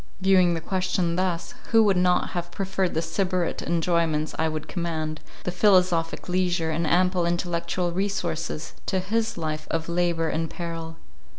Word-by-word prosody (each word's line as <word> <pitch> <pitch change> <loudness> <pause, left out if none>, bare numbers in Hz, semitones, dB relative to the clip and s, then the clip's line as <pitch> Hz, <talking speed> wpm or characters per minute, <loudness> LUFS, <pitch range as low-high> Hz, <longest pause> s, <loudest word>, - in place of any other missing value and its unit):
—Viewing 185 -2 +4
the 165 - -3
question 185 -1 0
thus, 180 -2 -1 0.2
who 225 -1 +6
would 200 -3 +3
not 180 0 +2
have 175 -1 -3
preferred 190 -1 -1
the 160 - +1
Sybarite 180 +1 -1
enjoyments 165 -2 +1
I 160 0 +2
could 155 0 -5
command, 160 -3 -3 0.2
the 180 - -2
philosophic 180 -3 +3
leisure, 180 -2 +1
and 160 +1 0
ample 180 +2 +3
intellectual 175 0 -1
resources, 170 -4 -2
to 190 - +1
his 220 +4 -1
life 155 -2 -3
of 165 0 -1
labour 170 -1 +1
and 160 0 -1
peril? 165 -1 -6
175 Hz, 155 wpm, -25 LUFS, 165-185 Hz, 0.2 s, who